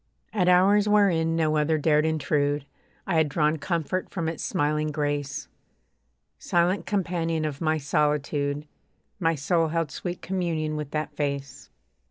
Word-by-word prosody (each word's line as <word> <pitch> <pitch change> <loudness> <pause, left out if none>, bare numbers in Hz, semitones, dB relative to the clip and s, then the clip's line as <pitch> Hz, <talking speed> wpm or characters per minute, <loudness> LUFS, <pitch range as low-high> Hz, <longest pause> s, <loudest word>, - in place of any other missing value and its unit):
At 180 -4 +2
hours 200 +3 +5
wherein 175 -6 +3
no 155 -2 +2
other 155 +1 +2
dared 150 0 +3
intrude, 145 -2 0 0.4
I 170 -4 0
had 160 -2 +3
drawn 150 +1 +1
comfort 170 +3 -2
from 170 -4 -3
its 165 0 -4
smiling 150 +1 0
grace. 145 -2 -2 0.9
Silent 175 +3 +1
companion 170 -5 -1
of 145 -2 -4
my 155 -1 +2
solitude, 145 0 0 0.5
My 165 -2 +2
soul 165 +3 +1
held 165 -2 -1
sweet 175 -1 -5
communion 165 -5 -1
with 150 -2 -4
that 150 -1 -3
face. 140 -1 -4
155 Hz, 140 wpm, -26 LUFS, 150-170 Hz, 0.9 s, hours